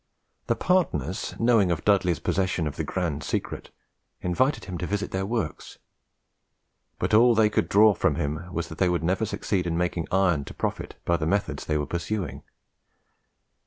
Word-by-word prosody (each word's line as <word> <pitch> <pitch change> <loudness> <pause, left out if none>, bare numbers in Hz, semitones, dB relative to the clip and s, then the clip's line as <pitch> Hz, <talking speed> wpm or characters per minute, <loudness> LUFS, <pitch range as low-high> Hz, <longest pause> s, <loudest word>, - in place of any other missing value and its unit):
The - - +2
partners 95 - 0
knowing 115 -5 +3
of 85 -3 -2
Dudley's 95 -5 +3
possession 95 -3 0
of 75 - -3
the - - -2
grand 80 -5 -2
secret, - - -3 0.5
invited 130 +11 0
him 90 -3 -6
to 90 - -3
visit 105 +1 -2
their 95 +1 -2
works; 105 -10 -4 1.2
but - - -2
all 120 +2 +6
they 110 -1 +4
could - - 0
draw 105 +1 +6
from 95 -6 +1
him 75 +3 -3
was 85 -2 -3
that 80 - -9
they 95 - +3
would 85 -2 0
never 95 +6 0
succeed 95 -3 -1
in 85 -1 -1
making 85 -1 -1
iron 90 -6 +2
to - - -10
profit - - -3
by 85 - +2
the 80 -2 -2
methods 100 +3 -1
they 75 - +1
were 75 - -1
pursuing. 85 +2 -3
90 Hz, 175 wpm, -26 LUFS, 85-105 Hz, 1.2 s, all